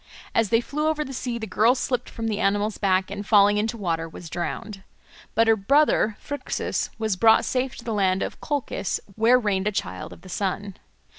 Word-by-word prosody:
As 225 -3 +2
they 230 0 +3
flew 300 +5 -2
over 305 -1 0
the 270 - -7
sea, 245 -2 -3
the 220 - -4
girl 220 +5 +3
slipped 250 -1 -2
from 225 0 -4
the 215 -2 -1
animal's 205 +2 0
back, 190 -1 +1
and 205 0 -4
falling 205 -1 +5
into 225 +2 -1
water 165 -5 -2
was 165 0 -10
drowned. 195 +3 -4 0.5
But 230 +1 +4
her 225 - +6
brother 225 -1 +2
Phrixus 285 0 -3
was 220 -3 0
brought 220 +4 +5
safe 255 0 -1
to 235 - -11
the 230 - -2
land 190 -2 +2
of - - -6
Colchis, 285 -9 -2 0.2
where 230 +3 +5
reigned 205 -4 0
a - - +2
child 95 - -4
of - - -12
the 185 - -14
sun. 195 +1 -3
215 Hz, 205 wpm, -24 LUFS, 195-235 Hz, 0.5 s, her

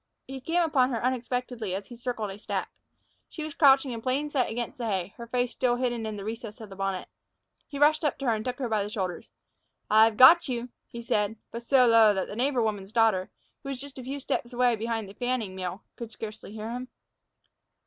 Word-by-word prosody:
He 265 0 -7
came 340 +6 +1
upon 270 -6 +3
her 235 -2 -2
unexpectedly 245 -5 -2
as 195 +1 -5
he 240 - -11
circled 235 -4 -3
a 195 - -9
stack. - - -3 0.6
She 315 - -6
was 310 -1 -5
crouching 270 -3 +5
in 230 -1 -5
plain 275 +4 -1
sight 260 -4 +1
against 240 +2 -4
the 235 - -2
hay, 190 -2 -2
her 235 -1 -8
face 245 0 0
still 245 -1 +1
hidden 240 -3 -1
in 215 - -4
the 200 - -6
recesses 220 0 -6
of 220 -2 -9
the - - -8
bonnet. 195 -1 -2 0.6
He 285 - -7
rushed 300 +2 +4
up 295 - 0
to 275 - -5
her 235 - +3
and 215 -1 -2
took 250 +1 -3
her 265 -3 -2
by 215 -2 +1
the 200 - -3
shoulders. 185 -5 -4 0.6
"I've 220 0 +6
got 310 +6 +8
you!" 245 0 -3 0.2
he 235 0 -8
said, 210 -1 0 0.2
but 235 - -5
so 255 +1 +4
low 225 -3 +6
that 190 - -1
the - - -7
neighbor 250 0 +1
woman's 205 -3 -3
daughter, 220 -5 +2 0.3
who 275 - -7
was 270 -2 -4
just 275 0 -9
a - - -7
few 275 +3 -4
steps 245 -2 -2
away 245 -1 +3
behind 225 -1 -3
a 195 - -11
fanning 245 -4 -2
mill, 185 +2 -5
could 235 -2 -7
scarcely 215 -1 -8
hear 220 +1 -6
him. 250 +1 -5
235 Hz, 230 wpm, -27 LUFS, 215-255 Hz, 0.6 s, got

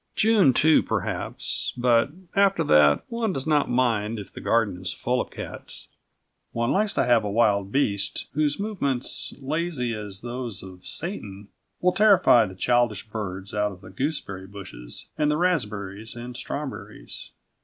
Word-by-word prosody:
June, 215 -9 +5
too, 155 +5 +5
perhaps; 60 +1 -2
but, 120 0 +3 0.3
after 195 -3 +4
that, 75 - +5
one 230 -3 -1
does 135 -7 -3
not 150 -2 +2
mind 115 -3 +1
if 100 - -8
the - - -8
garden 105 -6 +1
is 90 - -2
full 125 +1 0
of - - -6
cats. - - -7 0.6
One 115 +2 0
likes 210 +1 +2
to - - +2
have 120 -3 +4
a 105 - -2
wild 100 -2 +2
beast 100 -7 0
whose 150 +1 +1
movements, 155 - -2
lazy 140 -3 -1
as 105 -3 -6
those 120 -3 -4
of 90 -1 -11
Satan, 105 - -5 0.3
will 180 0 +3
terrify 185 - +6
the 95 - -9
childish 120 -1 +1
birds 100 -3 -5
out 105 -1 +1
of 90 -2 -12
the 95 -1 -12
gooseberry 100 -6 -3
bushes - - -9
and 150 -1 +3
the 150 - +2
raspberries 110 - -1
and 120 +1 -7
strawberries. 140 +1 -6
120 Hz, 155 wpm, -25 LUFS, 100-150 Hz, 0.6 s, terrify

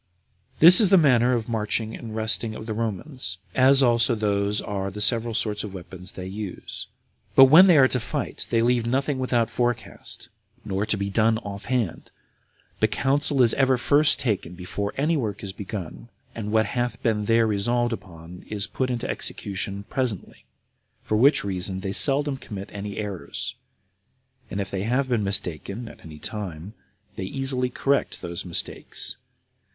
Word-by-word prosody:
6. - - -29
This 175 +7 +10
is 205 - +4
the 195 - +6
manner 125 -6 +4
of 115 -3 -1
the 115 - -7
marching 110 0 -1
and 110 -2 -8
resting 110 0 -1
of 110 - -8
the 110 - -3
Romans, 115 - -4 0.2
as 135 +1 +6
also 120 0 +3
these 105 -1 0
are 100 -1 -3
the 100 +2 -8
several 115 +1 +3
sorts 105 -2 -1
of 100 -2 -7
weapons 90 +1 -9
they 90 - -7
use. 100 0 -6 0.5
But 135 - +10
when 180 +5 +9
they 175 -4 +6
are 135 -2 +7
to 125 - 0
fight, 130 +4 -4
they 115 -1 +2
leave 120 -1 +1
nothing 135 +2 0
without 120 -3 +1
forecast, 120 -4 -3 0.4
nor 100 0 -2
to 110 - +1
be 100 0 -3
done 110 +2 +3
off 100 -2 -8
hand, 120 -8 -2 0.7
but - - +3
counsel 140 0 +2
is 115 - +5
ever 135 -2 +3
first 145 +4 +4
taken 100 -8 -2
before 100 +3 -4
any 155 +4 +1
work 105 -9 -3
is 95 -1 -5
begun, 100 +2 -7 0.2
and 105 -2 -5
what 110 0 +3
hath 120 +3 -3
been 105 -2 0
there 115 +1 +3
resolved 120 +3 0
upon 85 -4 -10
is 105 -2 -1
put 130 +4 -3
in 120 -2 -2
execution 100 0 -4
presently; 125 -8 -3 0.6
for 110 - -1
which 135 +7 +4
reason 95 -1 -2
they 95 - -3
seldom 140 +5 +3
commit 100 -6 -8
any 100 0 -6
errors; 105 -4 -4 1.0
and 100 - -4
if 95 -1 -4
they 95 - -2
have 125 +6 0
been 120 -4 0
mistaken 100 +3 -2
at - - -12
any 80 -2 -11
time, 95 0 -6 0.4
they - - -4
easily 130 +2 -1
correct 140 +2 -1
those 85 0 -4
mistakes. 90 -2 -4
110 Hz, 175 wpm, -24 LUFS, 100-125 Hz, 1.0 s, This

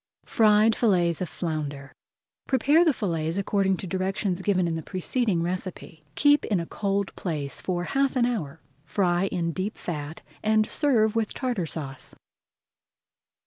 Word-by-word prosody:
FRIED 215 -2 +4
FILLETS 175 -7 +2
OF 180 - -2
FLOUNDER 145 -4 -4 0.5
Prepare 285 +5 +4
the 325 - +4
fillets 165 - -2
according 195 -1 +1
to - - -6
directions 190 0 -1
given 185 -3 +1
in 165 - -1
the 160 - -3
preceding 185 - -1
recipe. 175 -2 -5
Keep 290 0 +4
in 200 -5 +1
a 170 - -3
cold 200 +1 -2
place 150 -6 -4
for 175 -2 -2
half 275 +7 0
an 245 -2 +3
hour, 205 - -3 0.2
fry 175 +2 +1
in 170 -3 -1
deep 190 +5 -4
fat, 150 -2 -6 0.2
and 215 0 +3
serve 230 -7 +2
with 225 -2 -1
Tartar 240 - -2
Sauce. 135 -5 -6
190 Hz, 145 wpm, -26 LUFS, 170-215 Hz, 0.5 s, FRIED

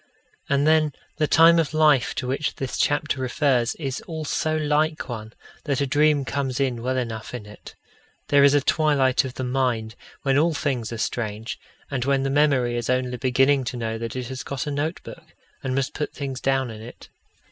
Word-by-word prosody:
And 140 +1 +2
then 155 -1 +3 0.2
the 155 -1 +1
time 165 +2 +6
of 160 -1 -1
life 150 -5 +4
to 130 - -3
which 140 +4 -1
this 135 -1 -4
chapter 145 -2 +1
refers 125 -2 +1
is 135 -4 -4
all 160 -2 -5
so 155 +2 0
like 155 +1 0
one, 110 -3 -6 0.3
that 140 -4 0
a 140 - +1
dream 145 0 +2
comes 135 -1 -2
in 130 -4 0
well 130 +2 -1
enough 115 -2 -4
in 115 -4 -7
it. 105 0 -13 0.5
There 140 -1 +5
is 140 0 +6
a 145 - +4
twilight 140 -3 +2
of 130 - -7
the 130 - -4
mind, 125 -4 -1 0.3
when 135 0 +3
all 165 +1 +2
things 130 -7 -2
are 115 - -4
strange, 110 -1 -3 0.3
and 130 -3 -1
when 135 0 +1
the 135 - -1
memory 135 -4 +2
is 120 0 -3
only 125 -1 0
beginning 135 +2 +3
to 120 - -4
know 115 -1 -3
that 115 0 -5
it 130 -1 -3
has 130 -1 -5
got 135 -2 -4
a 150 - -3
notebook, 145 +4 -5 0.3
and 130 -1 -2
must 135 -1 -1
put 150 - -3
things 135 -3 -5
down 135 -2 +1
in 110 -1 -9
it. 120 +2 -12
135 Hz, 200 wpm, -24 LUFS, 125-145 Hz, 0.5 s, time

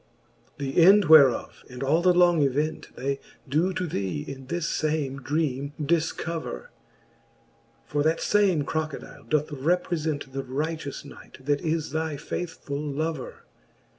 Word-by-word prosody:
XXII. 140 -1 -3
The 170 - +3
end 200 +3 +7
whereof, 150 -5 +5
and 125 +1 -6
all 155 +5 +3
the 180 +1 +5
long 175 -2 +4
event. 150 +3 0
They 140 +2 -2 0.3
doe 160 +8 +1
to 185 - -2
thee 145 - -3
in 135 -1 -8
this 170 +1 -2
fame 150 -3 -1
dreame 145 -1 -1
dilcover. 160 - -2 1.2
For 145 - -1
that 160 +2 +2
fame 195 -7 +3
Crocodile 155 0 -5
doth 150 -1 0
reprefent 155 -1 -1
The 135 - -2
righteous 145 +2 -4
knight, 130 - -14
that 145 0 +1
is 160 -3 -1
thy 160 -1 -2
faithfull 145 -3 -5
lover. 150 -1 -4
150 Hz, 135 wpm, -26 LUFS, 140-165 Hz, 1.2 s, end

